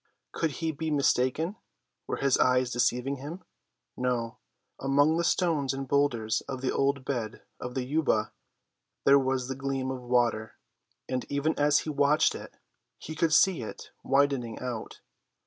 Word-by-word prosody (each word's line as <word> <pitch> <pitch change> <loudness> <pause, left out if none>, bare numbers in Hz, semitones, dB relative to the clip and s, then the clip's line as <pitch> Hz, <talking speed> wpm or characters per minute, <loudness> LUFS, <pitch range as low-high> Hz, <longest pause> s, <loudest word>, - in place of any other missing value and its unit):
Could 160 -3 -1
he 160 - +1
be 160 +1 -4
mistaken? 145 - +1 0.5
Were - - -2
his 135 -2 +2
eyes 125 0 +3
deceiving 125 +3 0
him? 155 +8 -8 0.5
No; 120 -2 -2 0.4
among 145 +3 +3
the 170 - +1
stones 165 -6 +1
and 135 0 -5
boulders 125 -6 +1
of 130 -2 -5
the 130 - 0
old 140 -1 0
bed 120 -5 -3 0.2
of 125 0 -6
the 130 - -1
Yuba 135 -6 +1 0.7
there 140 0 +7
was 130 -1 -1
the 135 - -2
gleam 135 -1 -2
of 130 -1 -5
water, 120 -3 0 0.5
and 130 -1 -2
even 145 +3 0
as 145 0 +4
he 155 - -4
watched 145 +2 +3
it - - -10 0.4
he 155 - -8
could 160 +1 +1
see 180 +1 +4
it 110 - -8
widening 135 -4 +1
out. 125 -3 -6
135 Hz, 155 wpm, -28 LUFS, 125-145 Hz, 0.7 s, there